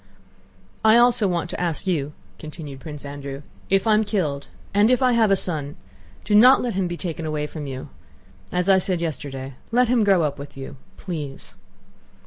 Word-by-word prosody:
"I 220 Hz, +1 st, +6 dB
also 240 Hz, -3 st, +4 dB
wanted 175 Hz, -1 st, -1 dB
to -, -, -4 dB
ask 170 Hz, -1 st, -2 dB
you," 150 Hz, -6 st, -1 dB, 0.3 s
continued 150 Hz, -3 st, -8 dB
Prince 150 Hz, -1 st, -8 dB
Andrew, 140 Hz, 0 st, -7 dB, 0.3 s
"if 195 Hz, +1 st, +2 dB
I'm 215 Hz, -1 st, +4 dB
killed 170 Hz, -10 st, -2 dB, 0.3 s
and 205 Hz, +2 st, +4 dB
if 255 Hz, +1 st, +3 dB
I 255 Hz, -, +4 dB
have 230 Hz, -3 st, +3 dB
a 195 Hz, -, +5 dB
son, 155 Hz, -6 st, -3 dB, 0.5 s
do 210 Hz, -, -2 dB
not 245 Hz, +6 st, +8 dB
let 240 Hz, -2 st, -2 dB
him 190 Hz, -1 st, 0 dB
be 175 Hz, 0 st, -5 dB
taken 165 Hz, -3 st, -4 dB
away 150 Hz, -1 st, -2 dB
from 150 Hz, -1 st, -7 dB
you—as 130 Hz, -, -7 dB
I 190 Hz, -1 st, +6 dB
said 185 Hz, -1 st, -1 dB
yesterday... 140 Hz, -5 st, -5 dB, 0.2 s
let 245 Hz, 0 st, +3 dB
him 240 Hz, -3 st, +3 dB
grow 195 Hz, -4 st, +4 dB
up 145 Hz, -2 st, -2 dB
with 140 Hz, 0 st, -10 dB
you.... 135 Hz, +1 st, -8 dB, 0.2 s
Please." 150 Hz, -7 st, -6 dB
170 Hz, 180 wpm, -23 LUFS, 145-205 Hz, 0.5 s, not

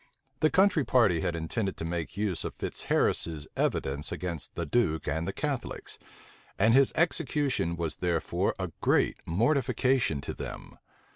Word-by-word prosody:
The 155 Hz, -, +4 dB
country 190 Hz, -4 st, +4 dB
party 115 Hz, -11 st, +3 dB
had 85 Hz, -, -1 dB
intended 95 Hz, +5 st, -2 dB
to 80 Hz, -, -4 dB
make 85 Hz, +1 st, -4 dB
use 100 Hz, -5 st, 0 dB
of -, -, -6 dB
Fitzharris's 80 Hz, -3 st, 0 dB
evidence 70 Hz, +2 st, -1 dB
against 85 Hz, -5 st, -5 dB
the 85 Hz, -, -2 dB
duke 80 Hz, -4 st, +1 dB
and 80 Hz, +3 st, -1 dB
the -, -, 0 dB
Catholics; 140 Hz, +1 st, -4 dB, 0.6 s
and 110 Hz, +3 st, +4 dB
his 135 Hz, +1 st, +5 dB
execution 145 Hz, -, +1 dB
was 85 Hz, -2 st, -3 dB
therefore 85 Hz, -2 st, 0 dB
a -, -, -4 dB
great -, -, +2 dB
mortification 125 Hz, -, +2 dB
to -, -, -5 dB
them. -, -, -8 dB
95 Hz, 145 wpm, -29 LUFS, 80-130 Hz, 0.6 s, his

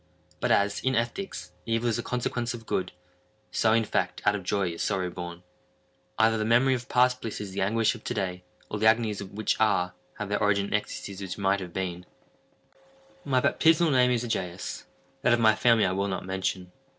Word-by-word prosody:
But -, -, 0 dB
as, 100 Hz, 0 st, +2 dB
in 130 Hz, 0 st, 0 dB
ethics, 120 Hz, +12 st, -3 dB, 0.2 s
evil 115 Hz, +1 st, 0 dB
is 115 Hz, 0 st, 0 dB
a -, -, 0 dB
consequence 120 Hz, 0 st, -2 dB
of 115 Hz, -1 st, -11 dB
good, 95 Hz, -, -1 dB, 0.6 s
so, 110 Hz, -, +2 dB
in 115 Hz, +1 st, +4 dB
fact, 90 Hz, -3 st, -1 dB
out 105 Hz, -, +5 dB
of 105 Hz, -, -3 dB
joy 95 Hz, 0 st, 0 dB
is 85 Hz, -, -6 dB
sorrow 90 Hz, -2 st, -1 dB
born. 85 Hz, 0 st, -7 dB, 0.7 s
Either 110 Hz, 0 st, +3 dB
the -, -, +1 dB
memory 120 Hz, +4 st, +4 dB
of 125 Hz, 0 st, -4 dB
past 125 Hz, 0 st, +3 dB
bliss 110 Hz, -, -5 dB
is 100 Hz, -2 st, -6 dB
the 95 Hz, -, -3 dB
anguish 110 Hz, +3 st, +2 dB
of 115 Hz, -, -11 dB
to -, -, -2 dB
day, 90 Hz, -3 st, -3 dB, 0.2 s
or 105 Hz, -, -4 dB
the 110 Hz, -, +4 dB
agonies 110 Hz, -2 st, +2 dB
which 100 Hz, +2 st, -2 dB
are, 90 Hz, -5 st, +2 dB, 0.2 s
have 105 Hz, -, -4 dB
their 105 Hz, +1 st, 0 dB
origin 100 Hz, -1 st, +2 dB
in -, -, -8 dB
the -, -, +4 dB
ecstasies 100 Hz, -1 st, -7 dB
which 95 Hz, -2 st, -5 dB
might 100 Hz, 0 st, +1 dB
have 90 Hz, -2 st, -7 dB
been. 90 Hz, -1 st, -4 dB, 1.2 s
My 130 Hz, -2 st, +2 dB
baptismal 160 Hz, +3 st, +4 dB
name 125 Hz, -2 st, +4 dB
is 120 Hz, -1 st, +1 dB
Egaeus; 90 Hz, -6 st, -4 dB, 0.4 s
that -, -, +4 dB
of 120 Hz, -, +3 dB
my 110 Hz, -1 st, +5 dB
family 115 Hz, 0 st, +4 dB
I 90 Hz, -, +1 dB
will 100 Hz, +1 st, 0 dB
not 95 Hz, -1 st, -3 dB
mention. 95 Hz, -1 st, -3 dB
105 Hz, 210 wpm, -27 LUFS, 95-120 Hz, 1.2 s, out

